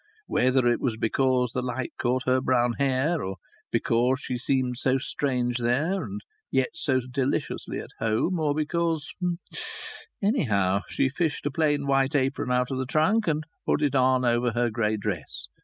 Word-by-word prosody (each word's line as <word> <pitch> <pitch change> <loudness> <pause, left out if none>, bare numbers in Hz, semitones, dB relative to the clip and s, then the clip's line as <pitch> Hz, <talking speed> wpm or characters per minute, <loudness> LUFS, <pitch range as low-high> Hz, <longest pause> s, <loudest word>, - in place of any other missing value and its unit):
Whether 130 0 +2
it 120 0 +2
was 120 -4 0
because 125 +2 +1
the 125 - -1
light 125 0 -3
caught 125 +1 +1
her 130 0 +3
brown 125 -2 +2
hair, 140 +4 +1
or 95 +1 -3 0.4
because 125 +3 +2
she 130 - -4
seemed 125 -1 0
so 130 0 +2
strange 125 -3 -1
there 150 +11 +1
and 205 +1 -6 0.3
yet - - +1
so 135 - +1
deliciously 130 +2 -2
at - - -9
home, 115 +11 +1
or 150 -2 +1
because 160 0 -1 1.1
Anyhow, 105 - +2
she - - +1
fished 155 +2 -2
a 145 - 0
plain 145 -1 +1
white 135 0 +2
apron 135 -2 0
out 125 +1 +1
of 130 - -2
the 130 - -2
trunk 185 - +2
and 155 -1 +1 0.2
put 150 - +2
it 145 -2 +2
on 130 -1 +3
over 120 0 +2
her 120 0 +1
grey 110 -1 0
dress. 100 -6 -4
130 Hz, 170 wpm, -26 LUFS, 120-145 Hz, 1.1 s, her